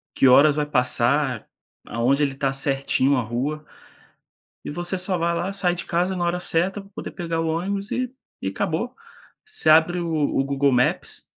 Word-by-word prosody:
que 135 Hz, -, +4 dB
horas 145 Hz, +3 st, +6 dB
vai 150 Hz, -1 st, 0 dB
passar, 125 Hz, -1 st, +1 dB, 0.4 s
aonde 130 Hz, +5 st, +1 dB
ele 135 Hz, -1 st, -1 dB
tá, 135 Hz, 0 st, 0 dB
certinho 135 Hz, 0 st, +1 dB
a -, -, +1 dB
rua 135 Hz, +7 st, -3 dB, 1.0 s
e -, -, -5 dB
você 175 Hz, +4 st, -3 dB
só 185 Hz, 0 st, -1 dB
vai 170 Hz, +1 st, +1 dB
lá, 185 Hz, +3 st, -2 dB
sai 185 Hz, -3 st, 0 dB
de -, -, -5 dB
casa 180 Hz, +2 st, 0 dB
na 175 Hz, -, -1 dB
hora 175 Hz, +1 st, 0 dB
certa 185 Hz, +4 st, 0 dB
pra 195 Hz, 0 st, -15 dB
poder -, -, -7 dB
pegar 165 Hz, -2 st, -3 dB
o 165 Hz, -, -1 dB
ônibus 195 Hz, +5 st, -2 dB
e 255 Hz, 0 st, -2 dB, 0.3 s
e 95 Hz, -, -1 dB
acabou, 165 Hz, -, -2 dB, 0.5 s
você 430 Hz, -, 0 dB
abre 165 Hz, +3 st, +5 dB
o 170 Hz, -, -3 dB
o 150 Hz, -3 st, +1 dB
Google 140 Hz, 0 st, +1 dB
Maps 125 Hz, 0 st, 0 dB
155 Hz, 185 wpm, -23 LUFS, 135-180 Hz, 1.0 s, horas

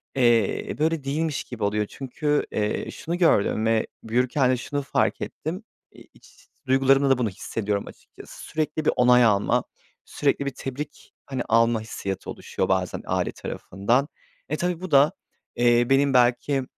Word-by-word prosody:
eee, 120 Hz, -5 st, +2 dB
böyle 160 Hz, -2 st, +1 dB
değilmiş 150 Hz, +2 st, -2 dB
gibi 115 Hz, -4 st, -7 dB
oluyor 105 Hz, +1 st, +1 dB
çünkü, 145 Hz, +3 st, -1 dB
eee, 105 Hz, 0 st, -2 dB
şunu 170 Hz, +2 st, -4 dB
gördüm 110 Hz, -, +2 dB
ve 115 Hz, 0 st, +2 dB, 0.2 s
büyürken 125 Hz, +3 st, +1 dB
de 130 Hz, -, +1 dB
şunu 145 Hz, +3 st, -3 dB
fark 135 Hz, -, 0 dB
ettim. 180 Hz, +8 st, -5 dB, 0.3 s
İ -, -, -15 dB
iç -, -, -22 dB, 0.2 s
duygularımla 135 Hz, +1 st, +4 dB
da 135 Hz, -, +4 dB
bunu 120 Hz, -4 st, 0 dB
hissediyorum 100 Hz, +1 st, -3 dB
açıkçası. -, -, -13 dB
Sürekli 155 Hz, 0 st, -2 dB
bir -, -, +4 dB
onay 125 Hz, 0 st, +5 dB
almak, 100 Hz, -3 st, +2 dB, 0.4 s
sürekli 140 Hz, -, 0 dB
bir 140 Hz, -, -1 dB
tebrik, 140 Hz, +3 st, -7 dB
hani, 130 Hz, -2 st, -4 dB
alma 115 Hz, 0 st, +3 dB
hissiyatı 100 Hz, -3 st, -5 dB
oluşuyor -, -, -3 dB
bazen -, -, 0 dB
aile -, -, 0 dB
tarafından. 120 Hz, +9 st, -1 dB, 0.4 s
E, -, -, -1 dB
tabii 175 Hz, -2 st, -2 dB
bu 185 Hz, -3 st, -6 dB
da, 145 Hz, +3 st, +6 dB, 0.4 s
eee, 120 Hz, 0 st, +3 dB
benim 135 Hz, 0 st, +3 dB
belki, 125 Hz, +2 st, +2 dB
130 Hz, 155 wpm, -24 LUFS, 115-145 Hz, 0.4 s, da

